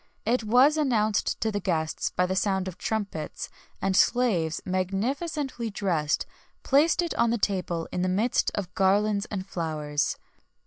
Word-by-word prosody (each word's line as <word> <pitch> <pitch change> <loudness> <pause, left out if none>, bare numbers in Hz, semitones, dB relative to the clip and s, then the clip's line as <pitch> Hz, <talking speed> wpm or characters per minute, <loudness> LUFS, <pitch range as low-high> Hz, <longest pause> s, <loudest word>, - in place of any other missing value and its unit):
It 235 +1 +1
was 255 +8 +5
announced 220 -8 +1
to 220 - +1
the 205 - -1
guests 160 -5 -1
by 180 - +1
the 185 +1 -2
sound 190 -1 0
of 185 - -7
trumpets; 200 -8 -3 0.3
and 195 -1 +1
slaves, 190 -10 +2
magnificently 235 - -2
dressed, 170 -7 0 0.4
placed 310 +5 +3
it 340 - -2
on 235 - +4
the 235 - +1
table 180 -5 -1
in 180 - -2
the 185 - +1
midst 220 +7 +1
of 190 -3 -4
garlands 200 +2 +2
and 190 -3 -4
flowers. 155 -5 -2
200 Hz, 150 wpm, -27 LUFS, 180-235 Hz, 0.4 s, was